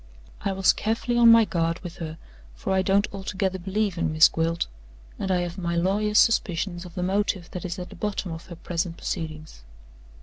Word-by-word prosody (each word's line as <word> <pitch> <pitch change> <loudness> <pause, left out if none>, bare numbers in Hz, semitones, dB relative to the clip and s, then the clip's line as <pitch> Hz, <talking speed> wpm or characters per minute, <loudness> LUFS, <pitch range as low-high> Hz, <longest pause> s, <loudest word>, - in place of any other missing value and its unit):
I 200 - 0
was 190 0 +4
carefully 225 +2 -1
on 235 -1 +7
my 230 -1 +7
guard 165 -2 -1
with 175 -3 -8
her; 160 -1 -6 0.4
for - - -2
I 190 - +3
don't 195 +2 +2
altogether 190 -1 -2
believe 195 0 -1
in 165 -2 0
Miss 155 +1 +7
Gwilt, 165 +1 0 0.5
and 195 - -2
I 180 -1 +2
have 175 +1 -4
my 170 -1 -2
lawyer's 205 +5 +1
suspicions 180 -4 +2
of 175 -1 -12
the 180 - -2
motive 190 -2 0
that 180 - -6
is 175 +1 -4
at 180 -1 -6
the - - -10
bottom 205 -3 -3
of 165 0 -8
her 175 - -8
present 170 0 -3
proceedings. 155 - -5
180 Hz, 200 wpm, -25 LUFS, 170-200 Hz, 0.5 s, on